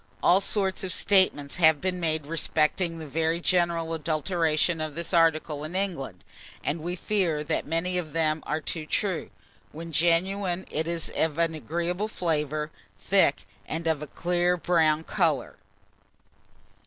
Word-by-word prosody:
All 185 +3 +5
sorts 195 -2 -1
of 185 - -2
statements 185 -10 +2
have 160 -3 +5
been 180 +1 -2
made 160 -3 -1
respecting 165 +2 0
the 160 - -7
very 160 +3 0
general 170 -2 +1
adulteration 160 +1 0
of 155 -2 -4
this 170 +2 -4
article 155 -3 +2
in 155 +4 -6
England, 165 - -3 0.4
and 155 +2 -2
we 175 +3 -3
fear 175 -6 0
that 155 +1 -2
many 175 +3 0
of 160 -4 -6
them 155 0 0
are 155 +1 -1
too 155 0 -3
true. 190 -2 -1 0.4
When 165 +2 -8
genuine, 175 +3 +1
it 160 +1 -1
is 170 -1 0
of 160 -1 0
an 165 -1 +1
agreeable 170 +6 -2
flavour, 155 -5 -1 0.3
thick, - - +2 0.2
and 165 +2 -4
of 160 -3 +1
a 150 - -5
clear 175 +3 0
brown 160 -3 +2
colour. 160 -8 0
165 Hz, 150 wpm, -27 LUFS, 155-180 Hz, 0.4 s, All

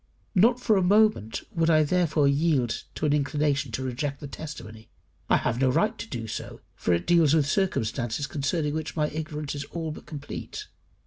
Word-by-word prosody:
Not 230 +5 +4
for 220 -4 +3
a - - +3
moment 195 - +3
would 165 -1 +1
I 155 -1 +5
therefore 160 -2 +2
yield 140 -4 +1
to - - -2
an 145 - +3
inclination 145 -1 0
to 130 - -2
reject 135 +2 -3
the - - -7
testimony. 115 -7 -9 0.4
I - - +5
have 120 - -1
no 130 - +4
right 210 - +2
to - - -5
do 115 -3 -4
so, 110 - -6
for - - -1
it 85 0 +1
deals 165 -3 +4
with 155 -3 +3
circumstances 130 - 0
concerning 145 +2 -1
which 155 0 -4
my 150 -2 +1
ignorance 155 -1 -4
is 145 -1 -5
all 160 +1 -4
but - - -10
complete. 160 - -7
150 Hz, 190 wpm, -26 LUFS, 135-165 Hz, 0.4 s, I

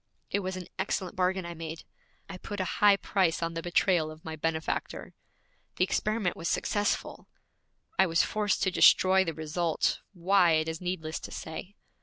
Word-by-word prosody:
It - - +1
was 185 -1 -4
an 180 - -6
excellent 190 -1 -2
bargain 185 0 0
I 170 - -5
made 160 -1 -7 0.4
I 190 -2 -8
put 205 +2 -6
a - - +1 0.2
high 205 -1 +7
price 185 -5 0
on 165 0 -2
the 165 - -4
betrayal 175 -1 +2
of 155 0 -12
my 160 -1 -5
benefactor! 160 0 -3 0.6
The - - +2
experiment 210 0 0
was 165 - -4
successful. 205 +4 -1 0.7
I 190 - +6
was 165 0 +3
forced 210 -1 0
to 190 - +2
destroy 190 +1 +6
the 165 -4 -4
result, 160 +1 -1
why 180 -1 +3
it 155 0 +1
is 160 +1 -4
needless 170 -3 -3
to - - -9
say. 180 +5 -7
180 Hz, 175 wpm, -29 LUFS, 165-190 Hz, 0.7 s, high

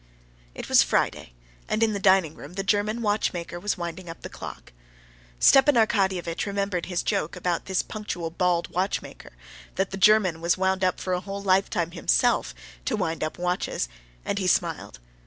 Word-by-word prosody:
It - - -7
was - - +6
Friday, - - 0 0.4
and 220 - +1
in 220 -1 +2
the 200 - -2
dining 190 -5 +4
room 145 +2 -11
the 195 +1 -3
German 210 +3 0
watchmaker 180 -5 -1
was 205 +3 -1
winding 170 0 -6
up 165 - -9
the - - -7
clock. - - -9 0.7
Stepan 275 +1 +6
Arkadyevitch 190 -6 +1
remembered 200 -3 -2
his 180 -1 -2
joke 195 -6 -1
about 175 -2 -2
this 190 -1 0
punctual, 180 -6 -5
bald 175 0 +1
watchmaker, 185 +3 -3 0.4
"that 190 0 -1
the 195 - -4
German 195 -5 +4
was 170 +2 +2
wound 190 0 +1
up 185 -1 +1
for 185 - -2
a 180 - +1
whole 200 +1 -6
lifetime 185 -3 +1
himself, - - +1 0.3
to - - 0
wind 165 0 -2
up 155 - -3
watches," 180 - -1 0.4
and 200 - -1
he 185 - -1
smiled. 165 - 0
185 Hz, 175 wpm, -25 LUFS, 170-200 Hz, 0.7 s, was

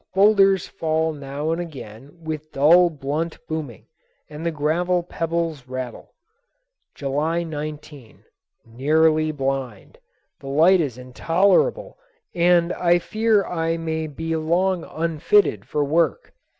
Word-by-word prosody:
Boulders 195 -2 +4
fall 160 0 -1
now 145 +2 -4
and 165 +2 -1
again 135 -2 -10
with 155 -1 -6
dull, 170 +6 +5
blunt 155 +2 -4
booming, 155 -8 -6 0.5
and 150 +2 -8
the 170 - 0
gravel 170 +4 0
pebbles 165 -5 -3
rattle. 130 -1 -7 0.8
July 150 +5 -1
19. 150 -5 -8 0.4
Nearly 155 +6 +2
blind. 135 -7 -4 0.4
The 135 - -11
light 165 +6 +4
is 135 -6 -3
intolerable 185 - +1 0.3
and 175 0 +3
I 175 -1 +3
fear 215 +3 +1
I 165 -1 -2
may 160 -1 -3
be 160 +2 -4
long 175 +3 0
unfitted 160 - +1
for 150 - -1
work. 165 - 0
160 Hz, 115 wpm, -22 LUFS, 145-170 Hz, 0.8 s, dull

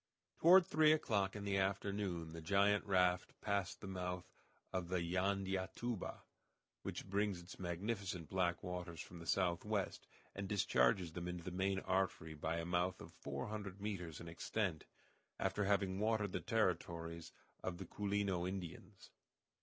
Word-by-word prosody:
Toward 180 +2 +9
three 155 -1 +5
o'clock 105 -11 +2
in 105 - -4
the 100 -1 +1
afternoon 95 -4 -1
the 80 - -6
giant 100 +4 +4
raft 90 -2 +2
passed 100 -3 -1
the 100 - -6
mouth 90 -1 -3 0.5
of 90 -2 -1
the 95 - +1
Jandiatuba, 95 +4 -1 0.6
which - - -5
brings 100 -1 +1
its 85 +2 -11
magnificent 90 -1 -2
black 90 -1 +1
waters 90 -2 -4
from 85 - -8
the 85 - -9
southwest, 95 +3 0 0.3
and 100 0 -4
discharges 85 -3 +3
them 85 +1 -4
into 90 -1 -4
the 90 - -4
main 95 +2 +1
artery 95 -4 0
by 80 +2 -2
a 85 - -2
mouth 90 +1 +1
of - - -10
four - - -4
hundred 100 -2 -5
meters 90 -7 -4
in 85 - -8
extent, 85 0 -1 0.5
after 105 - +1
having 100 -1 +2
watered 105 -2 +2
the - - -2
territories 85 -5 0 0.3
of 90 -2 -2
the 95 - -6
Culino 100 -2 0
Indians. 95 +1 -7
95 Hz, 150 wpm, -39 LUFS, 85-100 Hz, 0.6 s, Toward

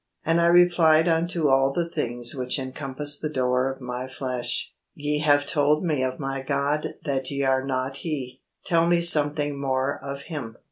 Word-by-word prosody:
And 165 +1 +2
I 170 - +3
replied 170 -2 +4
unto 165 -1 +1
all 135 0 +3
the 170 +4 -2
things 120 -6 -1
which 125 0 -2
encompass 140 +2 -2
the 155 - -3
door 130 -2 0
of 135 - -10
my 125 +1 -5
flesh, 130 -2 -3 0.2
'Ye 150 0 -2
have 145 -1 +3
told 150 +3 +1
me 150 -5 0
of 130 0 -2
my 135 -1 -4
God 140 +2 -2
that 135 -2 -2
ye 140 0 -2
are 130 -1 +1
not 135 0 -3
He: 135 -6 -5 0.2
tell 170 -2 +2
me 170 0 +3
something 145 -3 +4
more 135 0 -1
of 140 0 -6
Him.' 125 -9 -7
140 Hz, 180 wpm, -24 LUFS, 130-155 Hz, 0.2 s, replied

